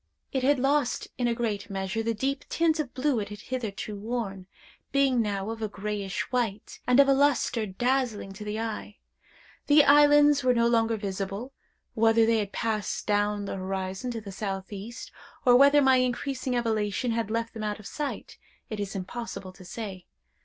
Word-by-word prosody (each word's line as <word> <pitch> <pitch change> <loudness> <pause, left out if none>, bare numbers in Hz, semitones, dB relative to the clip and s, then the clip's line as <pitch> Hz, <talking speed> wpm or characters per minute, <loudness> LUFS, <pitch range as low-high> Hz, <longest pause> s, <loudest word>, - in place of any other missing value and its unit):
It 265 - 0
had 280 +2 +3
lost, 275 0 +1
in 245 - +2
a 235 - +1
great 210 -3 -2
measure, 195 +3 -2
the 230 0 -1
deep 275 +5 -1
tint 325 -1 +2
of 285 -5 -2
blue 260 -2 +1
it 205 -1 -4
had 205 0 -9
hitherto 220 -4 -4
worn, 200 -3 -4 0.4
being 270 -3 +3
now 205 -1 -2
of 225 0 -7
a 215 - 0
grayish 205 -1 -3
white, 225 -5 -2
and 250 +2 +5
of 280 - +7
a 275 - +5
lustre 270 -5 +2
dazzling 240 0 -1
to 210 +2 -8
the 210 +1 -3
eye. 220 -2 -5 0.7
The 290 0 +7
islands 290 0 +6
were 250 -1 +3
no 235 0 +3
longer 230 -1 +2
visible; 200 +5 -4 0.4
whether 225 -1 +4
they 225 0 +3
had 200 -2 -3
passed 215 -2 -2
down 205 0 +1
the 195 - -4
horizon 190 +4 -3
to 230 -2 -4
the 200 -2 -8
southeast, 195 +3 -6 0.3
or 245 -1 +7
whether 280 +2 +6
my 265 -1 +5
increasing 255 +1 -1
elevation 225 0 0
had 225 -2 -1
left 230 +1 -2
them 220 - -6
out 210 0 -2
of 210 - -13
sight, 295 +5 -5 0.3
it 215 - -4
is 200 -1 -4
impossible 195 -1 -6
to 185 - -14
say. 190 -2 -7
225 Hz, 180 wpm, -27 LUFS, 205-255 Hz, 0.7 s, of